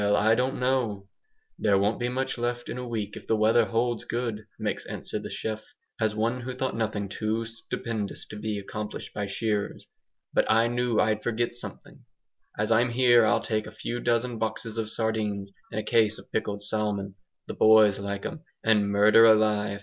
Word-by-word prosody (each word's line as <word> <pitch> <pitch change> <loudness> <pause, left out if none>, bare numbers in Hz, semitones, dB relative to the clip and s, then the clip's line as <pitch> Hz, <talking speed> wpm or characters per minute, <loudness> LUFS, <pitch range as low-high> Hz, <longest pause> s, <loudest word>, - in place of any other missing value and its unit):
"Well, 105 0 +3
I 105 +2 +4
don't 125 +3 0
know. 125 -6 0 0.5
There 100 -2 +3
won't 100 +3 +1
be 120 0 -1
much 130 +1 -2
left 120 0 -2
in 125 - -4
a 125 - -5
week 110 -3 -4
if - - -10
the 110 - +2
weather 110 +2 +4
holds 115 +3 -1
good," 115 -2 -3
makes - - -3
answer - - -5
the - - -7
chef, 110 -1 -4 0.4
as 110 -2 +1
one 115 +4 0
who 130 +1 -5
thought 130 +1 -2
nothing 105 -3 -2
too 110 +3 -2
stupendous 115 -1 -5
to - - -8
be 105 0 -3
accomplished 105 +1 -6
by 105 -1 -3
shearers, 105 0 -2 0.5
"but - - +2
I 115 +1 +4
knew 120 -1 0
I'd 110 0 +2
forgot 120 0 -1
something. 120 - -10 0.5
As 110 +2 -1
I'm 115 +2 +4
here 120 -2 +5
I'll - - +3
take 110 -1 -2
a - - -9
few 120 +2 -5
dozen 120 0 0
boxes 115 0 -3
of 110 -1 -2
sardines, 105 -3 -2 0.2
and 105 - -3
a - - -3
case 110 0 +2
of - - -15
pickled 100 -2 -2
salmon. 105 -2 +1 0.3
The - - -6
boys 110 -2 +6
likes 100 0 -4
'em, 165 -3 -5 0.2
and, 105 -2 +3
murder 105 +3 +6
alive! 105 -2 +3
110 Hz, 190 wpm, -27 LUFS, 105-120 Hz, 0.5 s, boys